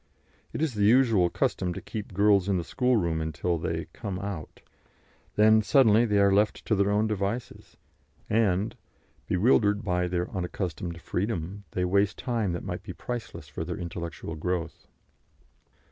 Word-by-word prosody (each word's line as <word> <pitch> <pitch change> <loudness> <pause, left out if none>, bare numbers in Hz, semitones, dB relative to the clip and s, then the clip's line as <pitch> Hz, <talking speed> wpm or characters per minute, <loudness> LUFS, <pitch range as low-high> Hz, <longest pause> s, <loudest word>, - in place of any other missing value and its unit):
It - - -2
is 155 -6 0
the 105 -1 +1
usual 110 -6 +4
custom 90 0 -1
to - - -4
keep 105 -2 -7
girls 100 0 +3
in 95 - +2
the 85 - -2
schoolroom 105 -10 +1
until 80 +2 -1
they 80 0 -2
"come 100 -5 -5
out"; 100 -5 -6 0.7
then, 110 +1 +6
suddenly, 115 -1 +5
they 105 -3 +1
are 100 -1 +4
left 105 +2 +1
to - - +1
their 100 -1 +2
own 105 +1 +2
devices, 105 +3 -4 0.5
and, 105 -2 +1 0.5
bewildered 105 0 +3
by 90 -2 0
their 90 0 -1
unaccustomed 90 -2 -4
freedom, 100 +1 -3
they 90 - -1
waste 100 +2 +2
time 115 -7 -1
that 85 - -4
might - - -4
be - - -8
priceless 120 -2 -6
for - - -5
their - - -5
intellectual 85 -1 -6
growth. 85 +1 -3
100 Hz, 155 wpm, -27 LUFS, 90-110 Hz, 0.7 s, then